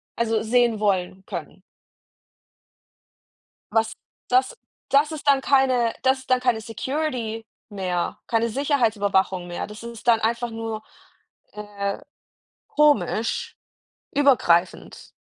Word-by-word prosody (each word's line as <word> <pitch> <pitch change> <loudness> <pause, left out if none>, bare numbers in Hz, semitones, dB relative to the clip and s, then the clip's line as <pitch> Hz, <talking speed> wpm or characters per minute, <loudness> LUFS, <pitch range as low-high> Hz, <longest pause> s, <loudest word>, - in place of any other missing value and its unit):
Also 225 -1 0
sehen 235 -1 +2
wollen 190 -2 0
können. 175 0 -7 2.1
Was 225 0 +1 0.4
das 255 +1 +2 0.3
das 290 +3 +3
ist 305 -2 -7
dann 275 -1 +5
keine 260 -4 +3
das 265 0 +3
ist 260 - -16
dann 255 0 +4
keine 245 -3 +1
Security 230 -1 -3 0.2
mehr, 185 -3 -3
keine 230 0 +1
Sicherheitsüberwachung 210 - +1
mehr. 175 - -4
Das 210 +1 -11
ist 235 +1 -9
dann 230 -1 +5
einfach 235 +2 -1
nur, 225 -1 -5 0.7
äh, 205 -1 -4 0.7
komisch, 295 -6 +1 0.6
übergreifend. 245 - +2
225 Hz, 105 wpm, -23 LUFS, 210-260 Hz, 2.1 s, dann